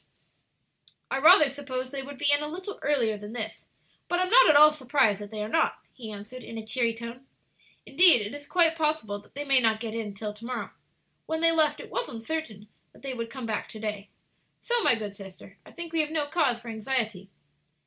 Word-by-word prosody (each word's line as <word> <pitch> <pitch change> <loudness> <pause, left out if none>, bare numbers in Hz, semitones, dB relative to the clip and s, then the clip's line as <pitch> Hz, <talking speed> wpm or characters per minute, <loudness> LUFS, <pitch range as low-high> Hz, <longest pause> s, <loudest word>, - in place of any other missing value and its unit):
"I 270 - 0
rather 310 +1 +7
supposed 260 -2 -5
they 275 -1 -3
would 280 +1 -9
be 290 +1 +2
in 290 +1 +3
a 300 - -3
little 370 +6 -7
earlier 235 -8 0
than 210 +2 -9
this, 220 -3 -6 0.4
but 355 - 0
am 365 +1 0
not - - +7
at 305 - +6
all 305 +1 +8
surprised 255 -8 +1
that 205 - -8
they 215 -1 -5
are - - -4
not," 320 +9 +1 0.2
he 225 -4 -8
answered, 215 +5 -9
in 225 - -8
a 220 - -7
cheery 230 0 -1
tone. 235 +3 -9 0.6
"Indeed, 350 -10 +7
it 205 - -7
is 290 0 -9
quite 335 -3 +3
possible 305 -10 -1
that 205 - -23
they 290 - -4
may 275 -2 +5
not 225 -3 +2
get 225 -1 -5
in 220 -3 -5
till 210 +1 -5
to 210 +2 -16
morrow. 250 -1 -5 0.6
When 320 0 -2
they 330 0 +5
left 310 -2 +2
it - - -11
was - - -2
uncertain 230 -3 -5 0.3
that - - -20
they 270 -1 -4
would 230 -2 -5
come 260 0 -7
back 220 -2 -3
to 220 - -9
day. 210 -2 -5 0.5
So, 480 -1 0
my 325 - +4
good 210 -3 -6
sister, 195 0 -13
I - - -14
think 340 -1 -8
we 325 - +3
have 300 - -3
no 310 -2 -1
cause 290 -6 +1
for 235 0 -11
anxiety." 220 -4 -2
255 Hz, 225 wpm, -27 LUFS, 220-305 Hz, 0.6 s, all